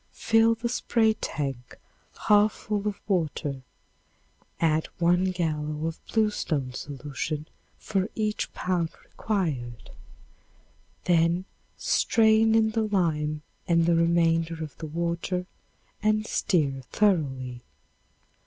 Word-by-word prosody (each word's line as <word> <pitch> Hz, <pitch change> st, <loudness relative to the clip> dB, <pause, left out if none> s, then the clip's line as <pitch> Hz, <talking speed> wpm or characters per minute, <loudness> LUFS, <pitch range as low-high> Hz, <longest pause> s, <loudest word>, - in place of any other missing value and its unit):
Fill 225 Hz, 0 st, +3 dB
the 230 Hz, +1 st, -3 dB
spray 230 Hz, -2 st, +2 dB
tank 135 Hz, -, -5 dB, 0.5 s
half 210 Hz, 0 st, +5 dB
full 210 Hz, -1 st, -3 dB
of 205 Hz, -, -3 dB
water, 155 Hz, -7 st, -1 dB, 1.0 s
add 160 Hz, -1 st, +2 dB
one 175 Hz, +2 st, +3 dB
gallon 155 Hz, -4 st, -2 dB
of 165 Hz, 0 st, -3 dB
bluestone 165 Hz, -, 0 dB
solution 145 Hz, +2 st, -4 dB, 0.3 s
for 195 Hz, -1 st, -1 dB
each 215 Hz, -1 st, -1 dB
pound 175 Hz, -3 st, -1 dB, 0.2 s
required, 145 Hz, -, -3 dB, 1.1 s
then 170 Hz, +1 st, +2 dB, 0.3 s
strain 220 Hz, 0 st, +3 dB
in 220 Hz, -1 st, +3 dB
the 225 Hz, 0 st, 0 dB
lime 155 Hz, -6 st, 0 dB, 0.2 s
and 170 Hz, -2 st, +3 dB
the 170 Hz, -, +3 dB
remainder 165 Hz, -1 st, +2 dB
of 150 Hz, -, -8 dB
the 160 Hz, -, -5 dB
water 170 Hz, +3 st, -2 dB, 0.6 s
and 215 Hz, 0 st, +2 dB
stir 145 Hz, -12 st, 0 dB
thoroughly. 135 Hz, -11 st, 0 dB
170 Hz, 105 wpm, -27 LUFS, 150-210 Hz, 1.1 s, half